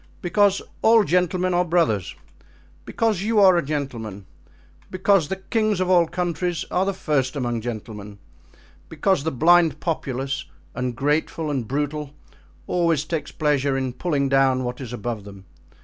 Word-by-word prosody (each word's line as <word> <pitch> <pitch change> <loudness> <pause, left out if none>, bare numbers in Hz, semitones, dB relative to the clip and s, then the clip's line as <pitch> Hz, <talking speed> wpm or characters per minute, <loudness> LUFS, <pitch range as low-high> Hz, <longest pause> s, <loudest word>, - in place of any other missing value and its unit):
"Because 200 +2 +2 0.2
all 225 0 +6
gentlemen 180 0 +1
are 175 0 +3
brothers, 160 - 0 0.7
because 220 -5 0
you 215 +1 +1
are 190 -2 +7
a 170 - +1
gentleman, 120 -9 -5 0.6
because 185 -3 +2
the 190 - -2
kings 215 +1 -1
of 185 0 +1
all 175 -2 +5
countries 175 0 -2
are 185 +2 +1
the 195 - 0
first 140 -6 -1
among 120 -4 -2
gentlemen, 105 -3 -7 0.7
because 160 0 +1
the 160 - -1
blind 165 +4 +4
populace, 135 -5 -3 0.3
ungrateful 145 +5 -1
and 130 -6 -2
brutal, 145 +2 -3 0.5
always 165 -4 +1
takes 160 -1 -4
pleasure 145 -3 0
in 130 -2 -2
pulling 140 -1 -1
down 135 -1 +3
what 125 +1 -5
is 125 -3 -7
above 120 -2 -4
them. 100 -1 -12
150 Hz, 145 wpm, -23 LUFS, 130-180 Hz, 0.7 s, are